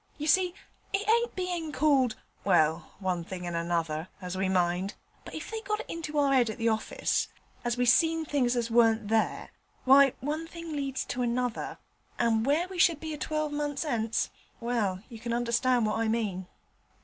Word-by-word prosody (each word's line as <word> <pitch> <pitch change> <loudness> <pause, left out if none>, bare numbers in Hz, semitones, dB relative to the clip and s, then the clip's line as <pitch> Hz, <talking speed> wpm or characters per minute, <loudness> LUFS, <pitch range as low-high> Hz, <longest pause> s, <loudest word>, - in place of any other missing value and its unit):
You 300 - -4
see 360 +2 +3 0.4
it 400 +2 0
ain't 470 +2 +2
bein' 355 -4 -2
called 275 -6 +3 0.3
well, 160 -4 +2
one 185 -3 -1
thing 180 +1 -6
and 175 -1 -3
another, 170 -1 -1
as 180 -1 -5
we 190 0 0
mind, 180 +1 +1 0.3
but - - -9
if - - -6
they 445 0 -3
got 425 0 -2
it - - -10
into 325 -2 -5
their 285 -2 +3
'ead 245 -4 +4
at 220 - -5
the 230 -1 +1
orfice 220 0 0 0.4
as 240 0 -1
we 245 - +2
seen 325 +6 +4
things 255 -5 +1
as 235 -1 -1
warn't 225 -2 +4
there, 220 0 0 0.3
why, 275 0 +7
one 305 +4 -3
thing 335 -1 -8
leads 275 -2 -2
to 250 - -3
another, 245 0 -1 0.4
and 230 0 +2
where 315 +6 +2
we 370 -1 -7
should 335 -3 +4
be 315 0 -5
a - - -5
twelvemunce 295 -1 -2
'ence 225 -5 0 0.3
well, 215 -6 -1
you 230 -3 -10
can 235 +1 -3
understand 240 0 +2
what 215 +1 0
I 225 - +1
mean.' 205 -5 -1
245 Hz, 185 wpm, -29 LUFS, 215-305 Hz, 0.4 s, why